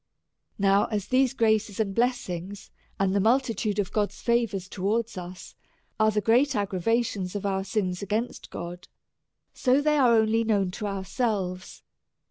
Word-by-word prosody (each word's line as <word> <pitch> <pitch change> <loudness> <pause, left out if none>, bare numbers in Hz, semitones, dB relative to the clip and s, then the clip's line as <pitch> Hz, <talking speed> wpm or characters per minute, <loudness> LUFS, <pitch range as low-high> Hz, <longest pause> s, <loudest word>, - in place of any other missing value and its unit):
Now 200 +1 +3
as 210 -3 -3
these 260 0 +3
graces 220 -3 +1
and 200 -3 0
blessings, 200 -5 -2 0.3
and 195 -1 +2
the 200 - +2
multi 235 +4 +2
tude 210 0 -2
of 205 -3 -1
God's 210 -1 -1
favour 235 -4 +1
towards 205 +5 -2
us, 180 0 -8 0.5
are 215 0 +5
the 210 -1 0
great 245 +7 +3
aggra 200 -3 -2
vations 220 -3 0
of 205 - -3
our 190 -1 0
sins 185 -2 -2
against 215 +5 -3
God, 175 +1 -7 0.7
so 255 +1 +2
they 300 +1 +2
are 245 -3 +5
only 220 +1 +3
known 200 -5 +1
to 210 +3 -4
ourselves. 195 -2 -3
210 Hz, 155 wpm, -26 LUFS, 190-230 Hz, 0.7 s, are